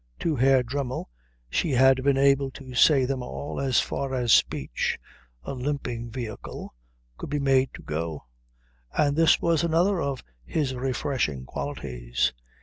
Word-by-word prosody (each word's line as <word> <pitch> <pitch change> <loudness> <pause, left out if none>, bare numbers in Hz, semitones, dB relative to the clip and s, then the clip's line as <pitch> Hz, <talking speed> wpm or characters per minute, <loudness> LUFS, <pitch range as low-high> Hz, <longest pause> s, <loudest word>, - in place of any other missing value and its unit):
To 160 -3 +1
Herr 130 0 +4
Dremmel 130 - -4 0.4
she 155 - 0
had 130 0 +5
been 140 -1 +3
able 140 0 +3
to 130 -3 -10
say 135 +1 +5
them 130 0 -2
all 140 +3 -5
as 130 -3 +3
far 135 -1 -2
as 120 -3 +3
speech, 65 -2 +1 0.5
a - - -5
limping 125 -3 -3
vehicle, 115 -3 -7 0.5
could - - -6
be 145 - -1
made 135 -1 +3
to - - -11
go, 80 0 -4 0.7
and 145 -1 +3
this 165 0 +5
was 165 -2 +2
another 170 +3 +2
of 140 -2 -3 0.2
his 135 - -1
refreshing 125 - -2
qualities. 60 - -2
135 Hz, 145 wpm, -26 LUFS, 120-140 Hz, 0.7 s, had